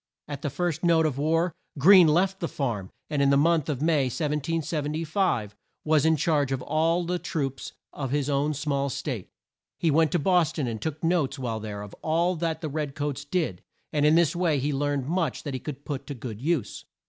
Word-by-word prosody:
At 145 -2 -6
the 145 - -2
first 160 +3 -2
note 165 -2 +4
of 140 -3 -1
war, 165 +3 +1 0.2
Greene 180 +4 +8
left 190 +5 +2
the 170 - -2
farm 115 -12 -3 0.2
and 150 -2 -1
in 140 - +4
the 140 - +4
month 160 0 +2
of 145 -1 -2
May, 155 -4 +3
1775, 150 - -1 0.3
was 155 -1 +3
in 160 - +4
charge 145 -3 +1
of 130 -1 -2
all 165 +3 +1
the 180 +1 -1
troops 135 -6 -3 0.2
of 135 -3 -4
his 145 +1 0
own 145 +1 +1
small 140 -1 -1
state. - - -4 0.5
He 165 - +1
went 160 +1 +3
to - - +4
Bos 175 -1 +2
ton, 145 - -2
and 115 -3 -4
took 155 +4 -4
notes 165 -5 +1
while 120 -4 -3
there 105 -1 -6
of 105 - -10
all 170 +3 +1
that 160 -1 -2
the 155 - -3
red 145 -1 -3
coats 145 -1 -3
did, 145 - -2 0.3
and 150 -1 +1
in 150 +2 +5
this 170 0 +3
way 170 -5 +1
learned 145 -1 -1
much 170 0 -1
that 145 - -4
he 130 - -3
could 140 +1 -7
put 140 -3 -5
to 145 - -5
good 115 -3 -7
use. 155 -5 -1
150 Hz, 205 wpm, -26 LUFS, 140-165 Hz, 0.5 s, Greene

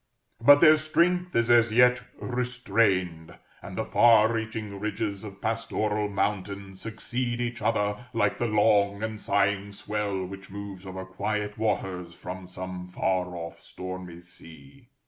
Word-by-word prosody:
But 145 +3 +8
their 155 -2 +8
strength 180 +3 +1
is 115 0 +3
as 120 -1 +5
yet 125 +2 +5 0.2
restrained; 105 -9 0 0.3
and - - -9
the - - -1
far 115 -1 +5
reaching 110 -3 -4
ridges 105 -1 -3
of 100 -2 -9
pastoral 110 -2 -1
mountain 100 -1 -2
succeed 120 +4 -4
each 120 0 -3
other, 105 +2 0
like 115 -1 0
the 120 - +1
long 105 -1 +3
and 110 -1 -4
sighing 100 0 +1
swell 100 -2 -3
which 95 +1 -9
moves 100 -1 -8
over 95 0 -6
quiet 105 +2 -3
waters 95 -5 -2
from 90 0 -8
some 90 0 -7
far 90 0 -1
off 85 -1 -7
stormy 90 -2 -8
sea. 90 - -14
105 Hz, 140 wpm, -27 LUFS, 95-115 Hz, 0.3 s, But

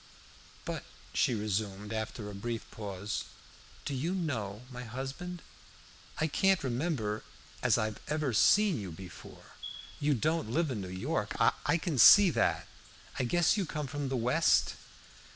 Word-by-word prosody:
"But," - - -4 0.3
she 120 - +2
resumed, 105 0 -2
after 110 -1 -4
a 105 - -7
brief 115 +3 -4
pause, 100 -1 -4 0.6
"do 145 - -2
you 160 +8 -1
know 115 - -3
my 125 0 -7
husband? 135 +9 -6 0.7
I 155 - +1
can't 190 +4 +2
remember 120 -5 -1 0.4
as - - +3
I 110 0 0
ever 150 -4 -1
seen 200 - +4
you 95 -4 -6
before. 90 +3 -11 0.5
You 145 0 +2
don't 155 +1 0
live 155 +4 +1
in 110 -5 -3
New 95 - -6
York: 95 +1 -2
I 150 +3 +2
can 160 -5 -2
see 200 - +9
that. - - +1 0.5
I 130 - +1
guess 175 - +3
you 195 -4 -1
come 150 -1 -3
from 140 0 -3
the 130 - -1
West." 125 +8 +3
130 Hz, 150 wpm, -31 LUFS, 105-155 Hz, 0.7 s, see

